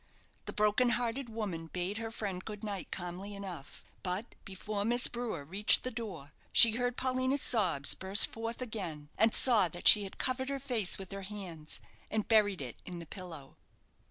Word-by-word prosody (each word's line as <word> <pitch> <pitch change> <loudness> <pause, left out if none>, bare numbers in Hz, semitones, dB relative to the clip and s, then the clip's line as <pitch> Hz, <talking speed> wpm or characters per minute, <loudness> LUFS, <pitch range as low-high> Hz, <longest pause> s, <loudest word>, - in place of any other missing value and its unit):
The - - -5
broken 210 +4 +2
hearted 240 +1 -3
woman 200 -8 -5
bade 180 +5 -3
her 225 0 -4
friend 200 -5 -5
good 210 0 -8
night 200 -4 -5
calmly 185 +3 -6
enough, 185 -8 -9 0.2
but 190 +5 -4
before 200 +2 -4
Miss 240 +3 +2
Brewer 230 -11 -2
reached 195 +7 +4
the 255 - -3
door, 185 - -7 0.2
she 230 - +8
heard 245 +2 -1
Paulina's 260 +1 0
sobs 180 - +1
burst 190 +3 +4
forth 230 +2 -5
again, 175 -11 -6
and 220 +1 +3
saw 230 -8 +7
that 175 +1 -3
she 210 - +9
had 195 - -9
covered 260 +1 -2
her 275 - -2
face 245 -8 -1
with 190 -2 -9
her 195 0 -6
hands, 185 -6 -7 0.3
and 215 -1 -2
buried 205 -7 +3
it 125 -3 -9
in 180 -1 -8
the 170 - -8
pillow. 165 -6 -9
205 Hz, 180 wpm, -32 LUFS, 180-230 Hz, 0.3 s, she